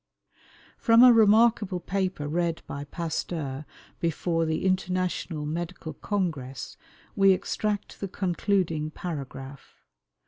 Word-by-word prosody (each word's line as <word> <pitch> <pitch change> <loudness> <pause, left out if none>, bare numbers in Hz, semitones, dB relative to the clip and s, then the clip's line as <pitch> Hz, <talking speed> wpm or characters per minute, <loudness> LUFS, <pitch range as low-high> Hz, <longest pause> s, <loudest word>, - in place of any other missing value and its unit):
From 230 +1 +6
a 250 -1 +9
remarkable 215 -3 +4
paper 185 -4 -2
read 170 +1 -1
by 140 +1 -6
Pasteur 155 -3 -4 0.3
before 165 0 0
the 160 +3 -1
International 185 -4 -1
Medical 165 +1 -4
Congress 145 -9 -3 0.4
we 195 -1 +6
extract 205 +2 -2
the 200 - -3
concluding 180 -4 0
paragraph. 140 -4 -7
175 Hz, 100 wpm, -27 LUFS, 155-195 Hz, 0.4 s, a